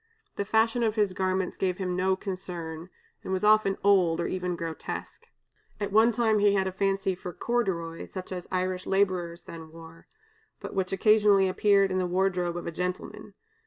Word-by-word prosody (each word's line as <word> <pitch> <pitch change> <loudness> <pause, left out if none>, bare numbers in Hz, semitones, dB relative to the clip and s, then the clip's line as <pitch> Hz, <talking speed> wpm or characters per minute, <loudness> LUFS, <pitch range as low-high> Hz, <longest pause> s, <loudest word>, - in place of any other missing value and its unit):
The 200 - -2
fashion 225 +3 +2
of 225 -2 +1
his 205 -4 +1
garments 185 0 -1
gave 185 -2 -1
him 180 -2 -2
no 190 +1 +2
concern, 175 -4 -6 0.3
and - - -5
was 190 +1 -1
often 210 -2 +4
old, 185 -5 +4
or 170 - -1
even 180 -1 -2
grotesque. 165 -1 -6 0.5
At 205 -1 -3
one 220 +3 +5
time 220 -2 +2
he 205 0 +4
had 190 -1 +1
a 190 - -2
fancy 195 0 0
for 180 0 -7
corduroy, 175 -7 -2
such 185 -1 -8
as 180 -1 -5
Irish 185 0 -2
laborers 185 -3 0
then 160 -1 -10
wore, 165 0 -14 0.5
but - - -7
which 190 -2 -1
occasionally 205 -1 +4
appeared 195 0 +3
in 185 - 0
the 180 - 0
wardrobe 180 -1 0
of 175 - -6
a - - -3
gentleman. 180 +2 -5
185 Hz, 180 wpm, -27 LUFS, 180-200 Hz, 0.5 s, one